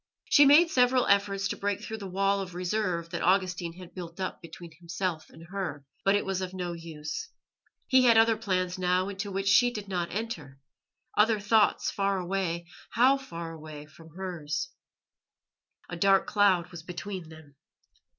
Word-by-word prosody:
She 290 - +8
made 325 +4 +6
several 250 -1 +3
efforts 200 -1 +2
to - - -2
break 200 -1 -2
through 220 0 -6
the 195 -2 -7
wall 195 +2 +1
of 180 -2 -7
reserve 180 -2 -2
that 170 - -3
Augustine 180 -2 +1
had 180 0 -12
built 175 -1 -8
up 185 - -4
between 170 0 -11
himself 170 -1 -4
and 165 +1 -14
her, 170 -8 -4 0.2
but 195 +1 +4
it 205 - 0
was 190 -1 -2
of 185 0 -5
no 180 -2 -3
use. 160 -2 -6 0.6
He 260 -2 +4
had 230 -2 +6
other 225 0 +5
plans 185 -4 -2
now 180 +1 +1
into 200 +1 -5
which 195 +1 -2
she 245 +5 +5
did 210 -4 -7
not 180 -3 -2
enter, 175 -11 -5 0.6
other 215 +1 +4
thoughts 210 +1 +2
far 195 -1 0
away 180 -2 -2 0.2
how 255 +4 +4
far 170 -11 -7
away! 155 -2 -9
from 160 +1 -17
hers. 160 -6 -4 1.2
A 175 - -6
dark 195 +2 +4
cloud 195 -5 +2
was 170 -2 -8
between 180 0 -7
them. 155 -3 -15
185 Hz, 170 wpm, -28 LUFS, 170-205 Hz, 1.2 s, She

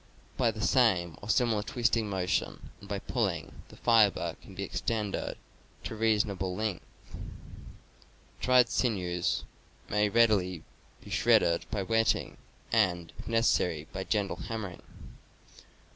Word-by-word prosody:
By 120 -3 +2
the 110 -1 -4
same 90 - +3
or 100 - -9
similar 115 -3 +2
twisting 115 -1 0
motion, 95 -2 -2
and 100 - -14
by 100 - -1
pulling, - - -3
the - - -15
fiber 110 -4 +3
can 95 - -13
be 100 - -4
extended 100 +3 -2 0.5
to - - -5
a - - -6
reason 110 -1 +2
able 95 -1 -3
length. 105 -3 -2 1.6
[Dried 125 -1 +5
sinews 90 -7 0 0.5
may 105 0 +2
readily 100 -6 +2 0.4
be - - -11
shredded 85 0 +3
by 100 -2 -2
wetting, 115 +3 +1 0.3
and, 90 -7 +1
if - - -9
necessary, 90 -9 +1
by 95 +1 -3
gentle 100 -1 -1
hammering. 105 -6 -6
105 Hz, 130 wpm, -30 LUFS, 90-115 Hz, 1.6 s, Dried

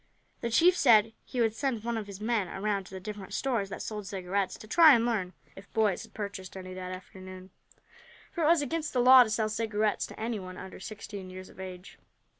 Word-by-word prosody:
The 235 - -2
chief 340 +10 +5
said 225 - +5
he 250 - -6
would 225 -2 +2
send 235 -2 -2
one 235 0 -2
of 215 -2 -4
his 200 -1 -9
men 215 -3 0
around 200 +1 -2
to - - -14
the - - -5
different 200 0 -7
stores 235 -8 -1
that - - -6
sold 210 -2 -5
cigarettes, 195 0 -2
to - - -12
try 315 +4 +8
and 230 0 +1
learn 200 -6 -1 0.2
if 195 +1 -13
boys 215 -4 +2
had - - -13
purchased 195 -3 -6
any 185 0 -8
that 185 0 -6
afternoon, 185 0 -10 0.8
for 340 - -2
it - - +4
was 330 -2 +4
against 310 +2 -3
the 255 - +1
law 255 +1 +9
to 225 - -5
sell 215 0 0
cigarettes 215 -1 -1
to - - -12
anyone 205 -5 -4
under 190 - -9
sixteen 200 -1 -8
years 185 0 -9
of - - -17
age. 185 0 -9
210 Hz, 220 wpm, -29 LUFS, 190-235 Hz, 0.8 s, law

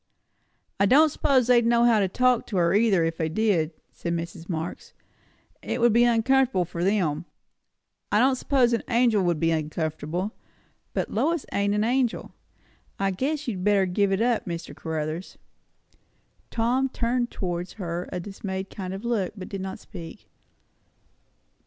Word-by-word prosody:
"I 200 - +4
don't 305 +8 +6
suppose 265 -3 +2
they'd 240 -1 +5
know 235 0 +3
how 235 -2 +5
to 195 - +2
talk 250 +4 +2
to 200 - -3
her 170 0 +3
either, 205 -4 +3
if 165 0 -1
they 160 -1 -1
did," 175 -4 +1 0.2
said 170 - -4
Mrs. 170 +1 -6
Marx. 165 0 -5 0.7
"It - - -3
would 235 -1 +4
be 240 +1 +5
uncomfortable 240 -3 +3
for 170 0 -4
them; 175 -5 +1 0.9
I - - +3
don't 260 +4 +4
suppose 255 -2 +2
an 230 - +1
angel 235 -4 +3
can 175 -2 +1
be 165 +2 +1
uncomfortable. 160 +4 -2 0.6
But - - -1
Lois 335 -2 0
ain't 200 0 +1
an 210 - +1
angel. 245 0 0 0.6
I 195 0 0
guess 285 +9 -2
you'd 190 -6 -3
better 200 -1 +3
give 195 +2 +1
it 195 +3 +1
up, 240 -4 0
Mr. 170 -1 -5
Caruthers." 160 +2 -4 1.1
Tom 245 +4 +1
turned 240 0 -1
towards 175 -1 -4
her 175 -3 -4
a 180 - -3
dismayed 190 0 -5
kind 190 -1 -5
of 200 +4 -8
look, 220 -6 -1
but 185 - -7
did 195 -2 -5
not 190 0 -5
speak. 170 -5 -11
200 Hz, 160 wpm, -25 LUFS, 175-235 Hz, 1.1 s, don't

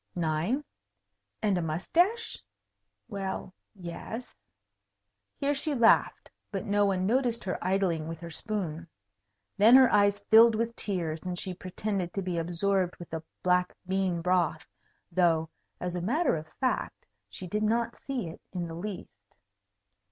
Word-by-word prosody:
9. 170 - 0 0.8
And 205 -3 +2
a - - -1
moustache? 340 - 0 0.6
Well, 195 -3 -4 0.2
yes. 195 +6 -7 1.0
Here 285 +1 +1
she 290 +1 -1
laughed, 230 -2 +3 0.2
but 195 -2 -3
no 205 0 +3
one 185 -1 0
noticed 240 +1 +1
her 185 - -3
idling 180 -4 +1
with 165 -1 -6
her 170 0 -7
spoon. 170 -4 -4 0.7
Then 225 +5 +8
her 260 -1 +7
eyes 205 0 +4
filled 220 +3 +6
with 230 +1 -1
tears, 165 -6 -2
and 180 -1 -4
she 185 +1 -3
pretended 185 0 -3
to 195 - -1
be 180 -2 -1
absorbed 180 +2 0
with 175 - -11
the 160 0 -3 0.2
black 180 0 +2
bean 185 -3 0
broth, 175 -4 +1 0.5
though, 165 -2 +2 0.3
as 180 -1 -3
a 180 - -2
matter 280 - +2
of 155 0 -6
fact, 260 -2 -1 0.2
she 185 - -8
did 210 +4 -2
not 230 +1 +1
see 260 -3 -4
it 160 - -9
in 175 -2 -3
the 165 - -7
least. 165 - -8
190 Hz, 145 wpm, -29 LUFS, 170-220 Hz, 1.0 s, Then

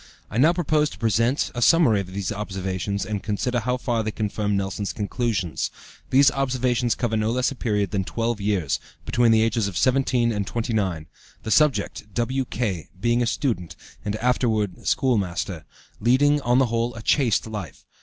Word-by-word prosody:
I 115 - -1
now 155 +6 +6
propose 155 -3 +1
to - - -11
present 115 +4 +1
a 120 - -4
summary 125 -7 +5
of 95 - -8
these 100 0 -3
observations, 100 -1 -3
and 105 -2 -3
consider 120 +4 -1
how 125 +2 -1
far 120 -2 -1
they 110 - -2
confirm 105 -1 -1
Nelson's 100 +1 -3
conclusions. 105 - -2 0.4
These 135 +1 +5
observations 125 -3 0
cover 115 -2 -1
no 110 0 +1
less 125 +3 +1
a - - -6
period 105 -6 -1
than 100 -2 0
twelve 115 +1 -2
years, 100 -8 0 0.3
between 120 -1 +3
the 110 0 +5
ages 115 -2 +1
of 95 -4 -4
17 130 -2 +2
and 105 -3 -2
29, 105 -9 -1 0.4
the 110 - -4
subject, 115 -8 +1
W.K., 120 - -2
being 120 +3 +2
a 120 - +1
student, 110 - -2 0.3
and 105 0 -2
afterward 110 -4 0
schoolmaster, 95 - 0 0.3
leading, 145 +6 +3
on 120 -1 +2
the 135 - +5
whole, 115 0 -1
a 115 - -8
chaste 125 -5 +2
life. 105 -10 -7
115 Hz, 170 wpm, -24 LUFS, 100-125 Hz, 0.4 s, now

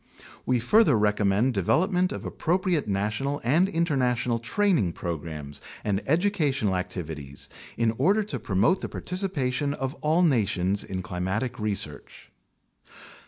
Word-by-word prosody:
We 125 -1 +3
further 150 - +4
recommend 105 +3 +2
development 180 - +2
of - - -6
appropriate 175 -3 0
national 105 +8 -1
and 160 +10 +3
in 170 -2 +1
ternational 125 -5 0
training 150 - +1
programs 75 -3 -5 0.2
and 100 -1 0
educational 150 - +1
activities 80 -6 -5 0.3
in 115 -1 +2
order 200 +10 +3
to 150 -11 -4
promote 105 - +2
the - - -4
participation 145 -7 -1
of 135 -1 -3
all 160 +4 +3
nations 100 - +2
in 95 -1 -5
climatic 95 +9 -3
research. 100 -9 -5
125 Hz, 120 wpm, -26 LUFS, 95-160 Hz, 0.3 s, further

